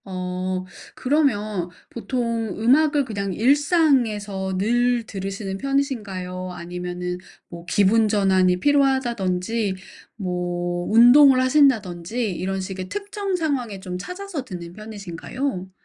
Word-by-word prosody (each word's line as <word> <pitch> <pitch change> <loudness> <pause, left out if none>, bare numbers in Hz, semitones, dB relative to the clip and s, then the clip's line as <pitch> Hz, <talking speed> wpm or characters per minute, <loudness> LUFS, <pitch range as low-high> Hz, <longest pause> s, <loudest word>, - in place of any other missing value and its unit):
어. 185 0 -3 0.3
그러면 215 - 0 0.2
보통 230 -2 -2
음악을 285 +5 +3
그냥 200 -5 -3
일상에서 235 - +2
늘 240 +4 +2
들으시는 195 -1 -5
편이신가요 200 -10 -2
아니면은 180 0 -5 0.3
뭐 170 0 -10
기분 205 +4 +3
전환이 190 -3 +3
필요하다든지 230 -7 +1 0.4
뭐 175 -2 -3
운동을 255 +4 +7
하신다든지 235 - +2
이런 190 +2 -3
식의 185 -1 -6
특정 400 - -3
상황에 265 - -2
좀 180 -2 -5
찾아서 360 - -6
듣는 175 -7 -8
편이신가요? 205 +1 -5
205 Hz, 265 characters per minute, -23 LUFS, 185-260 Hz, 0.4 s, 운동을